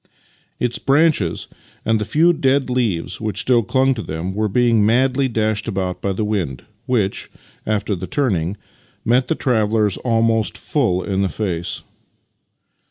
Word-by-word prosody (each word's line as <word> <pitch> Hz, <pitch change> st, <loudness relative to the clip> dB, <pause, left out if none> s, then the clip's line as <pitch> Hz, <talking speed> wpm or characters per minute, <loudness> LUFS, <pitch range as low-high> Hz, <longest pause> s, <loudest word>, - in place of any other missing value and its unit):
Its 120 Hz, -1 st, -1 dB
branches 135 Hz, -, +2 dB, 0.4 s
and 110 Hz, -1 st, +2 dB
the -, -, -1 dB
few 165 Hz, +8 st, +4 dB
dead 135 Hz, -4 st, +1 dB
leaves 115 Hz, -10 st, -1 dB
which 110 Hz, -1 st, -2 dB
still 125 Hz, -2 st, +3 dB
clung 130 Hz, +4 st, +2 dB
to 115 Hz, -, -5 dB
them 85 Hz, +1 st, -4 dB
were 110 Hz, +2 st, 0 dB
being 115 Hz, 0 st, +3 dB
madly 130 Hz, +5 st, +3 dB
dashed 110 Hz, -2 st, -1 dB
about 95 Hz, -4 st, -2 dB
by 100 Hz, -, -1 dB
the 105 Hz, +3 st, -1 dB
wind, 90 Hz, -, -2 dB, 0.2 s
which, 110 Hz, -6 st, 0 dB, 0.4 s
after 105 Hz, -1 st, 0 dB
the 90 Hz, +1 st, -6 dB
turning, 95 Hz, -, 0 dB, 0.5 s
met 125 Hz, +2 st, +3 dB
the 160 Hz, -, 0 dB
travellers 110 Hz, -6 st, +1 dB
almost 115 Hz, -2 st, +1 dB
full 100 Hz, -11 st, 0 dB
in 95 Hz, -1 st, -1 dB
the 95 Hz, -, +1 dB
face. 90 Hz, -6 st, -3 dB
110 Hz, 150 wpm, -20 LUFS, 100-125 Hz, 0.5 s, few